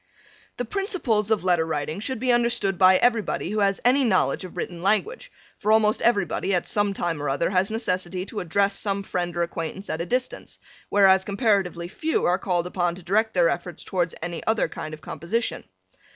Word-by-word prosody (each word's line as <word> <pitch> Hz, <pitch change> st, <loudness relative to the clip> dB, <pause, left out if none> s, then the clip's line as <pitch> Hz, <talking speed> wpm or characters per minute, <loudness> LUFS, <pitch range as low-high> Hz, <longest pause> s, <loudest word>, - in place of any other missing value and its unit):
The 245 Hz, -, -2 dB
principles 255 Hz, -, 0 dB
of 220 Hz, -5 st, +1 dB
letter 175 Hz, -3 st, +3 dB
writing 155 Hz, +2 st, -3 dB
should 260 Hz, +4 st, -2 dB
be 255 Hz, +1 st, +1 dB
understood 235 Hz, -6 st, +1 dB
by 185 Hz, 0 st, +7 dB
everybody 230 Hz, -3 st, 0 dB
who 215 Hz, -, -1 dB
has 200 Hz, -1 st, +2 dB
any 265 Hz, +3 st, +4 dB
knowledge 200 Hz, -4 st, +1 dB
of 185 Hz, -, -10 dB
written 175 Hz, -2 st, -5 dB
language, 435 Hz, -, 0 dB, 0.3 s
for 215 Hz, -, +1 dB
almost 220 Hz, -1 st, +3 dB
everybody 200 Hz, -3 st, +1 dB
at 175 Hz, -, -1 dB
some 205 Hz, -1 st, 0 dB
time 170 Hz, -5 st, -2 dB
or 145 Hz, -, -1 dB
other 140 Hz, +6 st, 0 dB
has 190 Hz, 0 st, +2 dB
necessity 185 Hz, -4 st, -2 dB
to 210 Hz, -, -6 dB
address 195 Hz, +4 st, +1 dB
some 200 Hz, 0 st, -1 dB
friend 175 Hz, -2 st, -3 dB
or 170 Hz, -, +2 dB
acquaintance 170 Hz, +3 st, -5 dB
at 160 Hz, +1 st, -3 dB
a 170 Hz, -, -4 dB
distance, 255 Hz, +1 st, -3 dB, 0.3 s
whereas 190 Hz, -2 st, +5 dB
comparatively 200 Hz, -5 st, 0 dB
few 310 Hz, -, -1 dB
are 180 Hz, +2 st, +2 dB
called 175 Hz, -3 st, 0 dB
upon 175 Hz, -2 st, -1 dB
to 180 Hz, -, -12 dB
direct 215 Hz, +5 st, +1 dB
their 175 Hz, -2 st, +4 dB
efforts 175 Hz, -1 st, -4 dB
towards 175 Hz, -3 st, -1 dB
any 170 Hz, -1 st, -5 dB
other 220 Hz, -1 st, +2 dB
kind 155 Hz, 0 st, -7 dB
of 155 Hz, -, -20 dB
composition. 220 Hz, +11 st, -3 dB
195 Hz, 195 wpm, -24 LUFS, 175-220 Hz, 0.3 s, by